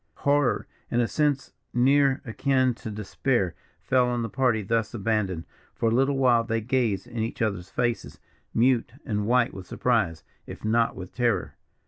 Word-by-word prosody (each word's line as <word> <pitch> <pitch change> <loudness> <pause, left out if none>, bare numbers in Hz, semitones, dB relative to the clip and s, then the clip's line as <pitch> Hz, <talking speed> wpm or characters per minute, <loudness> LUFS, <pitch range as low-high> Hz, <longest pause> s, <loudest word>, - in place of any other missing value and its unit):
Horror, 145 -2 +2 0.2
and 120 - +1
a 120 - +2
sense 145 -1 0 0.2
near 135 +2 +3
akin 130 +2 +1
to 115 - -8
despair, 105 -1 -1 0.3
fell 125 -1 +2
on 120 -1 -1
the 115 - -3
party 120 -1 +1
thus 115 +3 -1
abandoned. 100 -6 -1 0.3
For 115 - +1
a - - 0
little 135 +3 +2
while 125 -3 +4
they 115 0 -1
gazed 115 -3 0
in 115 - -7
each 110 +1 -3
other's 100 -5 -1
faces, 120 -1 -2 0.3
mute 120 0 +2
and 105 -4 -1
white 125 0 +3
with 95 -2 -9
surprise, 105 -10 0 0.2
if - - -8
not 115 +1 +2
with 90 -1 -8
terror. 120 -6 0
115 Hz, 165 wpm, -26 LUFS, 110-130 Hz, 0.3 s, while